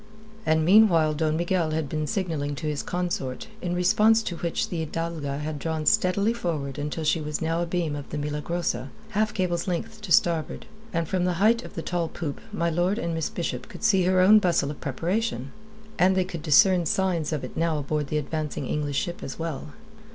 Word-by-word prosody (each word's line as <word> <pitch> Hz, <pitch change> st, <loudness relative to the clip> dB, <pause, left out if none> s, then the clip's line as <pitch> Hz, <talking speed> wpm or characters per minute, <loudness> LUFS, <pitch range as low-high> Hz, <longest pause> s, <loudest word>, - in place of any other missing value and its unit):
And 160 Hz, 0 st, +3 dB
meanwhile 175 Hz, -5 st, +6 dB
Don 155 Hz, 0 st, 0 dB
Miguel 170 Hz, -1 st, +1 dB
had 155 Hz, -1 st, -1 dB
been 155 Hz, +1 st, -2 dB
signalling 160 Hz, -8 st, -2 dB
to 155 Hz, -, -6 dB
his 150 Hz, -2 st, -1 dB
consort, 175 Hz, -8 st, -3 dB, 0.2 s
in 175 Hz, -1 st, -2 dB
response 215 Hz, +5 st, +4 dB
to 175 Hz, -5 st, -4 dB
which 170 Hz, 0 st, -2 dB
the 165 Hz, -3 st, -2 dB
Hidalga 160 Hz, -3 st, -3 dB
had 150 Hz, 0 st, -4 dB
drawn 160 Hz, 0 st, -2 dB
steadily 200 Hz, +7 st, +3 dB
forward 150 Hz, -, -3 dB
until 150 Hz, +2 st, -3 dB
she 160 Hz, +1 st, +2 dB
was 150 Hz, 0 st, -3 dB
now 165 Hz, +1 st, 0 dB
abeam 170 Hz, -3 st, -1 dB
of 145 Hz, -1 st, -7 dB
the -, -, -4 dB
Milagrosa, 150 Hz, -1 st, -2 dB, 0.2 s
half 215 Hz, 0 st, +1 dB
cable's 180 Hz, -4 st, -1 dB
length 220 Hz, +5 st, -3 dB
to 205 Hz, -4 st, -7 dB
starboard, 165 Hz, 0 st, +2 dB, 0.3 s
and 165 Hz, -2 st, -1 dB
from 180 Hz, +1 st, 0 dB
the 180 Hz, -, +1 dB
height 220 Hz, +7 st, +3 dB
of -, -, -11 dB
the 165 Hz, -, -4 dB
tall 175 Hz, -1 st, -1 dB
poop 160 Hz, -3 st, -5 dB
my 170 Hz, -5 st, 0 dB
lord 175 Hz, +5 st, +1 dB
and 170 Hz, -7 st, -2 dB
Miss 160 Hz, -2 st, -1 dB
Bishop 170 Hz, -, -4 dB
could -, -, -10 dB
see 195 Hz, -5 st, +4 dB
her 185 Hz, 0 st, +4 dB
own 210 Hz, +4 st, +8 dB
bustle 170 Hz, -7 st, +1 dB
of 150 Hz, -, -10 dB
preparation. 165 Hz, -, -2 dB, 0.5 s
And 185 Hz, +1 st, +4 dB
they 185 Hz, -, +2 dB
could 170 Hz, -3 st, -6 dB
discern 175 Hz, +3 st, +5 dB
signs 175 Hz, -3 st, 0 dB
of 150 Hz, -4 st, -2 dB
it 130 Hz, -, -7 dB
now 165 Hz, -1 st, +1 dB
aboard 150 Hz, 0 st, -2 dB
the 155 Hz, -, -1 dB
advancing 150 Hz, -1 st, -3 dB
English 145 Hz, 0 st, -2 dB
ship 175 Hz, +4 st, -2 dB
as -, -, -6 dB
well. 155 Hz, -3 st, -5 dB
165 Hz, 205 wpm, -26 LUFS, 150-185 Hz, 0.5 s, own